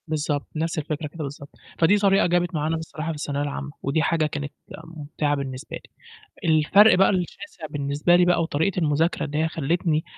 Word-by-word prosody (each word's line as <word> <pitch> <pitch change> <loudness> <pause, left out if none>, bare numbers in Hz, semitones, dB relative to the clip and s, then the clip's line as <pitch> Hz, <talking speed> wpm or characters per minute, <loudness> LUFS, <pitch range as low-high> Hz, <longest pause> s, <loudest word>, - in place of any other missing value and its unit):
بالضبط، 150 -2 -2
نفس 165 +2 -2
الفكرة 150 0 -3
كده 155 +1 -7
بالضبط. 140 0 -8 0.3
فدي 180 +5 +5
طريقة 195 -2 +3
جابت 175 0 0
معانا 155 +2 0
بصراحة 160 0 -6
في 165 - -2
الثانوية 145 -1 -3
العامة، 145 0 -4
ودي 140 +4 +1
حاجة 160 -1 +1
كانت 145 -1 -4 0.3
مُمْتِعَة 150 -2 -3
بالنسبة 135 0 -6
لي. - - -11 0.6
الفرق 160 +8 +6
بقى 190 +1 +5
الشاسع 185 -1 -4
بالنسبة 145 +4 +1
لي 175 0 +5
بقى 175 -1 +3
وطريقة 165 +4 0
المذاكرة 160 +1 +1
اللي 150 -1 -4
هي 160 +1 +2
خلّتني 160 0 0
155 Hz, 175 wpm, -24 LUFS, 145-170 Hz, 0.6 s, الفرق